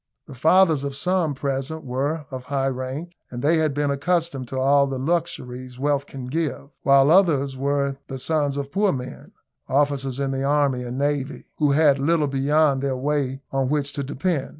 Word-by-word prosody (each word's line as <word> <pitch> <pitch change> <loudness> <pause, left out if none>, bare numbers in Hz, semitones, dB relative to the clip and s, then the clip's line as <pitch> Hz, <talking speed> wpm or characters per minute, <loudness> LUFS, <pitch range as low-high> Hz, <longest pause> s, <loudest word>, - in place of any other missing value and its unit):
The 145 - -11
fathers 160 +2 +4
of 140 -1 -4
some 175 -1 0
present 140 +3 -3
were 140 +5 -2
of 130 -1 -6
high 135 0 0
rank, 130 +6 -5 0.2
and 120 0 -6
they 160 +3 +4
had 155 -3 +1
been 145 -1 0
accustomed 145 -2 -1
to 130 - -5
all 140 +1 +4
the 135 -1 -3
luxuries 130 -5 -3
wealth 140 +1 0
can 135 -2 -8
give, 145 0 -3
while 140 +1 +5
others 150 -7 +3
were 140 0 -1
the 135 - -5
sons 145 +1 0
of 140 0 -4
poor 200 +2 +2
men, 130 -1 -7 0.4
officers 135 -1 0
in 135 -1 -1
the 135 0 -2
army 140 -2 +2
and 125 +1 -5
navy, 145 0 -2
who 145 -2 +3
had 145 -2 +4
little 155 +2 +2
beyond 140 0 +2
their 135 -2 -1
pay 140 -1 -1
on 135 -1 0
which 145 -1 -1
to 140 - -3
depend. 145 +1 -2
140 Hz, 185 wpm, -23 LUFS, 135-150 Hz, 0.4 s, while